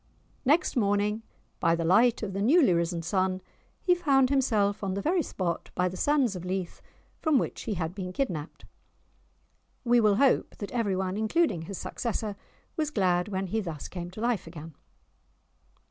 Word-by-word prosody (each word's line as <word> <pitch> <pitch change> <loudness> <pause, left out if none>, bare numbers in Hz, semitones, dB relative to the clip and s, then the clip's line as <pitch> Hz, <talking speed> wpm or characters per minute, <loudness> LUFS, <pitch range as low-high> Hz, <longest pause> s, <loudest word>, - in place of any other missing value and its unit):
Next 305 +6 +3
morning, 210 -1 +1 0.4
by 165 0 +3
the 165 0 -2
light 225 +7 +4
of 195 -3 -3
the 195 - -2
newly 265 - +5
risen 170 0 -1
sun, 185 +1 0 0.4
he 360 - +5
found 275 -7 +3
himself 215 -7 +1
on 190 -1 -1
the 200 - -2
very 345 +3 +2
spot 175 - -3
by 180 0 +2
the 180 - -5
sands 270 -2 +2
of 180 - -6
Leith 185 -1 -4 0.4
from 315 -4 +3
which - - -2
he 215 - -2
had 165 -1 -3
been 185 -2 -5
kidnapped! 180 - -4 1.2
We 240 -1 +4
will 210 -2 +4
hope 270 +4 +2
that 205 - -6
every 220 -6 0
one, 190 +1 -2
including 220 - +1
his 185 +3 -7
successor, 220 -3 -3 0.4
was 310 -3 -1
glad 180 -8 +1
when 195 -1 -2
he 220 +4 -1
thus 165 -7 -6
came 175 -1 -6
to 190 +4 -9
life 235 -7 0
again. 165 -1 -9
200 Hz, 175 wpm, -28 LUFS, 180-245 Hz, 1.2 s, newly